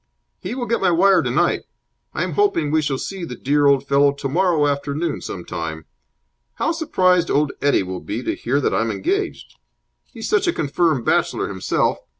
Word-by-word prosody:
"He - - -5
will 250 -2 -3
get 235 -1 -1
my 190 - +3
wire 185 +1 +4
tonight. - - +1 0.5
I'm - - -1
hoping 400 - +1
we 155 0 +3
shall 145 -3 -1
see 190 +6 -5
the 145 -7 -6
dear 145 +4 +2
old 140 -1 +3
fellow 140 0 +4
tomorrow 150 +3 +1
afternoon 145 +3 -2
some 90 - -7
time. 80 -1 -5 0.7
How - - 0
surprised 185 - +2
old 150 0 +2
Eddie 145 -8 +3
will 95 0 -5
be 115 +5 -5
to - - -1
hear 135 +4 -1
that - - 0
I'm 115 0 +1
engaged. 395 - -3 0.5
He's - - -6
such 420 -4 +2
a 345 - +2
confirmed 150 -3 0
bachelor - - +1
himself. - - 0
150 Hz, 175 wpm, -21 LUFS, 140-185 Hz, 0.7 s, wire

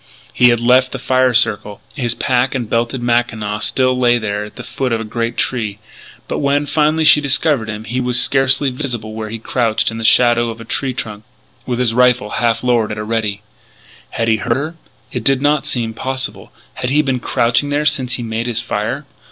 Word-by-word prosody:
He 125 - +5
had 120 -1 +2
left 125 +2 +3
the - - -3
fire 130 0 +2
circle. 110 -3 +1
His 120 -5 -1
pack 130 0 0
and 120 -3 -2
belted 120 +3 -1
mackinaw 115 -3 0
still 130 +2 +1
lay 120 -1 +3
there 105 -2 -3
at 105 - -13
the - - -8
foot 130 -2 -3
of 115 - 0
a - - -4
great 115 +2 -3
tree. 110 -5 -1 0.5
But - - -3
when, 145 +1 +1
finally, 155 +2 +1
she 150 -1 +6
discovered 140 -4 +1
him, 105 0 -5
he 125 +3 -3
was 125 0 +1
scarcely 135 +1 +2
visible 120 -5 -4
where 110 0 -5
he 115 - -5
crouched 115 -1 0
in 115 - -6
the - - -5
shadow 120 0 +4
of 115 0 -7
a 115 - -9
tree 130 +2 -2
trunk, 105 -3 -6 0.4
with 125 -2 -1
his 120 -2 +1
rifle 125 -3 +3
half 115 -1 +1
lowered 120 -3 +1
at 105 - -4
a 105 - -3
ready. 105 -2 -2 0.7
Had 115 - -2
he 110 -1 +3
heard 115 +3 -1
her? 155 +4 -4 0.4
It 125 - -4
did 135 +2 +3
not 145 +1 +1
seem 115 -3 -1
possible. 130 +3 -4 0.2
Had 125 - -3
he 150 +3 +3
been 135 -3 -1
crouching 120 +4 +1
there 145 +1 0
since 135 -4 +1
he 120 - -3
made 115 +1 -3
his 115 -2 0
fire? 115 +5 -3
120 Hz, 210 wpm, -17 LUFS, 115-130 Hz, 0.7 s, she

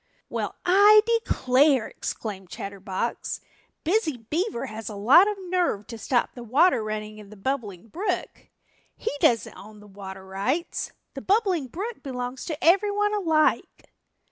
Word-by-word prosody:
"Well, - - -3
I 410 +4 +7
declare," 280 - +3
exclaimed 195 -4 -6
Chatterbox, 195 +3 -4 0.4
"Busy 330 - +1
Beaver 300 - -2
has 220 +1 -7
a 210 - -7
lot 260 - +6
of 420 -1 -2
nerve 350 - 0
to 230 - -8
stop 240 +3 0
the 245 - -9
water 260 +1 +3
running 215 0 -5
in 205 -2 -12
the 215 - -13
Bubbling 215 -4 -4
Brook. 365 - -4 0.5
He - - -3
doesn't 230 -5 +2
own 210 +3 -13
the 210 - -15
water 190 -1 -10
rights. 205 - -2 0.2
The 270 - -7
Bubbling 380 - +1
Brook 415 - -6
belongs 250 -1 -5
to 315 -4 -4
everyone 410 +4 +3
alike." 325 -7 +1
255 Hz, 145 wpm, -25 LUFS, -, 0.5 s, I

